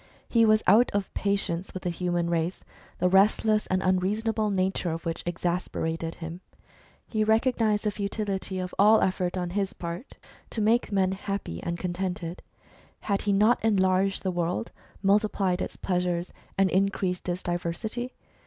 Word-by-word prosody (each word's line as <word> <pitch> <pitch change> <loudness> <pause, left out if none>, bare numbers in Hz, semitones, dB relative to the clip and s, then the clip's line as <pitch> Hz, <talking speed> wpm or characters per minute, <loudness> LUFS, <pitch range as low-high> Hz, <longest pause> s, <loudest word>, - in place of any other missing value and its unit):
He 230 -1 +4
was 215 0 +4
out 235 +4 +6
of 200 -2 -1
patience 195 -3 -1
with 185 - -5
the 180 - 0
human 175 0 -1
race, 170 +1 -1 0.3
the 180 - +2
restless 210 +3 +3
and 185 0 0
unreasonable 210 +4 +1
nature 190 -2 0
of 165 0 -4
which 165 0 -2
exasperated 170 -2 -2
him. 165 +1 -7 0.6
He 215 -2 0
recognised 220 -1 +2
the 210 - +1
futility 200 -2 -3
of 180 -1 -4
all 215 +2 +7
effort 185 -1 0
on 180 -1 -2
his 200 +1 -1
part 170 +8 -7 0.3
to - - -3
make 225 +3 +2
men 190 -2 +2
happy 190 - -4
and 170 0 -3
contented. 180 -1 -3 0.6
Had 200 -2 0
he 205 - 0
not 215 +5 +3
enlarged 195 -2 +2
the 190 - 0
world, 175 +5 -2 0.3
multiplied 195 -2 +2
its - - -4
pleasures, 180 -1 -1 0.2
and 195 -1 +3
increased 190 -1 0
its 175 +1 -3
diversity 175 +8 -3
190 Hz, 155 wpm, -27 LUFS, 175-210 Hz, 0.6 s, all